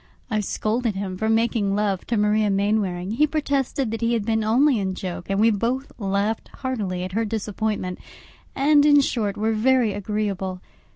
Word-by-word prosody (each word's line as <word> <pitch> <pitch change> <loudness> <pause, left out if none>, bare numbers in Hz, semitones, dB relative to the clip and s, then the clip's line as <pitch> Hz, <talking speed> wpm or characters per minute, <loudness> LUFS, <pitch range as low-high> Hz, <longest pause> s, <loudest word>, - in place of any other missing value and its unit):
I 215 - +1
scolded 215 +2 -1
him 190 -1 -4
for 220 +4 -1
making 225 -3 +1
love 200 -3 -1
to 235 - 0
Maria 210 0 +2
Mainwaring; 195 -2 0
he 300 +7 +3
protested 280 -5 -1
that 225 - -4
he 230 +1 +1
had 225 -3 0
been 220 -1 +1
only 245 +4 +3
in 190 -1 -2
joke, 180 -2 -6
and 195 0 0
we 225 +2 +5
both 240 +6 -1
laughed 200 +2 -1
heartily 205 -9 -3
at 185 - -5
her 225 +4 0
disappointment; 210 -3 -3 0.6
and, 290 +1 +4
in 290 -1 +6
short, 215 -6 -1
were 220 +2 +1
very 235 -1 +2
agreeable. 200 -2 -3
215 Hz, 175 wpm, -23 LUFS, 200-235 Hz, 0.6 s, in